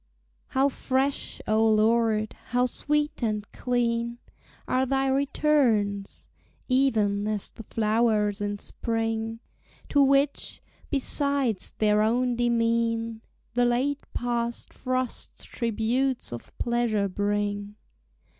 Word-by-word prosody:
How 265 Hz, +1 st, +2 dB
fresh, 270 Hz, 0 st, -1 dB
O 215 Hz, +1 st, +3 dB
Lord, 220 Hz, 0 st, +3 dB
how 245 Hz, +1 st, +1 dB
sweet 295 Hz, +4 st, -1 dB
and 215 Hz, -3 st, -1 dB
clean 235 Hz, -1 st, -1 dB, 0.5 s
Are 255 Hz, -, +2 dB
thy 270 Hz, +1 st, +1 dB
returns! 265 Hz, -7 st, +1 dB, 0.4 s
even 215 Hz, -6 st, +2 dB
as 215 Hz, -2 st, -2 dB
the -, -, -10 dB
flowers 215 Hz, -2 st, +1 dB
in 205 Hz, 0 st, -2 dB
spring; 225 Hz, +1 st, -3 dB, 0.5 s
To 285 Hz, -, +4 dB
which, 275 Hz, +1 st, +2 dB, 0.3 s
besides 280 Hz, -6 st, 0 dB
their 210 Hz, -1 st, +3 dB
own 240 Hz, +3 st, +2 dB
demean, 230 Hz, -1 st, +1 dB, 0.3 s
The 245 Hz, 0 st, +3 dB
late 260 Hz, +4 st, +1 dB
past 235 Hz, -1 st, -2 dB
frosts 255 Hz, -1 st, -3 dB
tributes 235 Hz, -, -1 dB
of 120 Hz, -, -8 dB
pleasure 235 Hz, -4 st, +1 dB
bring. 205 Hz, +1 st, -2 dB
235 Hz, 100 wpm, -27 LUFS, 215-255 Hz, 0.5 s, To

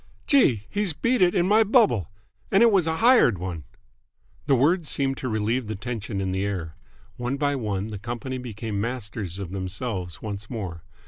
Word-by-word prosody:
"Gee! 130 Hz, -, +3 dB
He's 205 Hz, -4 st, -1 dB
beat 235 Hz, -, +1 dB
it 175 Hz, -1 st, +4 dB
in 175 Hz, 0 st, +3 dB
my 215 Hz, +3 st, +5 dB
bubble! 205 Hz, -, +3 dB, 0.4 s
And 195 Hz, +4 st, +5 dB
it 235 Hz, -, +6 dB
was 185 Hz, -5 st, +3 dB
a 160 Hz, -, +1 dB
hired 235 Hz, -, +5 dB
one!" 85 Hz, -4 st, -5 dB, 0.8 s
The 140 Hz, -, +5 dB
words 155 Hz, +5 st, +2 dB
seemed 135 Hz, -1 st, 0 dB
to 130 Hz, -, -3 dB
relieve 110 Hz, +2 st, -1 dB
the 110 Hz, -, -3 dB
tension 105 Hz, -2 st, -4 dB
in 95 Hz, -1 st, -1 dB
the 95 Hz, +1 st, -1 dB
air. 90 Hz, -6 st, -3 dB, 0.4 s
One 125 Hz, +2 st, -2 dB
by 145 Hz, 0 st, +1 dB
one 105 Hz, -4 st, -2 dB
the 105 Hz, -2 st, -6 dB
company 120 Hz, +4 st, -5 dB
became 110 Hz, -4 st, -4 dB
masters 105 Hz, -6 st, -4 dB
of 95 Hz, -3 st, -6 dB
themselves 95 Hz, -1 st, -4 dB
once 105 Hz, -1 st, -6 dB
more. 95 Hz, -9 st, -5 dB
115 Hz, 185 wpm, -25 LUFS, 100-145 Hz, 0.8 s, it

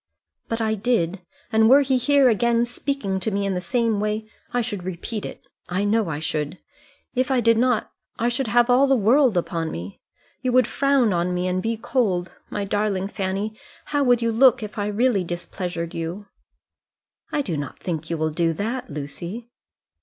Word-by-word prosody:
"But 225 Hz, -, -1 dB
I 220 Hz, -1 st, +1 dB
did, 200 Hz, -5 st, 0 dB, 0.3 s
and 220 Hz, 0 st, +5 dB
were 275 Hz, +3 st, +8 dB
he 265 Hz, -2 st, +2 dB
here 280 Hz, +1 st, +4 dB
again, 235 Hz, +1 st, +3 dB
speaking 240 Hz, -5 st, -2 dB
to 190 Hz, -, -1 dB
me 200 Hz, -1 st, -1 dB
in 195 Hz, -, 0 dB
the 180 Hz, -, -2 dB
same 225 Hz, +3 st, 0 dB
way, 215 Hz, +1 st, -2 dB, 0.2 s
I 245 Hz, -, +1 dB
should 210 Hz, -6 st, -4 dB
repeat 185 Hz, +4 st, -4 dB
it. -, -, -11 dB, 0.2 s
I 185 Hz, +3 st, 0 dB
know 210 Hz, -2 st, +1 dB
I 145 Hz, -, -2 dB
should. 155 Hz, +2 st, -3 dB, 0.5 s
If 255 Hz, +2 st, 0 dB
I 260 Hz, -2 st, +3 dB
did 230 Hz, -1 st, +4 dB
not, 245 Hz, 0 st, +1 dB, 0.3 s
I 235 Hz, -, +1 dB
should 245 Hz, +1 st, -1 dB
have 240 Hz, +1 st, +4 dB
all 255 Hz, +3 st, +5 dB
the 270 Hz, -, +4 dB
world 240 Hz, 0 st, +4 dB
on 165 Hz, -1 st, -2 dB
me. 90 Hz, -, -7 dB, 0.4 s
You 255 Hz, -2 st, 0 dB
would 255 Hz, 0 st, +5 dB
frown 275 Hz, -6 st, +2 dB
on 175 Hz, +1 st, 0 dB
me, 180 Hz, +1 st, -1 dB
and 185 Hz, 0 st, 0 dB
be 225 Hz, +3 st, -1 dB
cold. 200 Hz, -7 st, 0 dB, 0.2 s
My 205 Hz, -, -3 dB
darling 200 Hz, -1 st, -1 dB
Fanny, 200 Hz, +2 st, -3 dB, 0.4 s
how 290 Hz, -1 st, +3 dB
would 245 Hz, -2 st, +3 dB
you 230 Hz, -, +2 dB
look 235 Hz, 0 st, +5 dB
if 210 Hz, +1 st, -6 dB
I 205 Hz, -, 0 dB
really 210 Hz, -1 st, +2 dB
displeasured 175 Hz, 0 st, -4 dB
you?" 165 Hz, +5 st, -4 dB, 1.1 s
"I 290 Hz, -, 0 dB
don't 150 Hz, -, -4 dB
think 165 Hz, -3 st, -4 dB
you 165 Hz, -, -1 dB
will 155 Hz, 0 st, 0 dB
do 165 Hz, +1 st, +1 dB
that, 230 Hz, +9 st, -3 dB
Lucy." 170 Hz, +11 st, -6 dB
215 Hz, 190 wpm, -23 LUFS, 180-240 Hz, 1.1 s, were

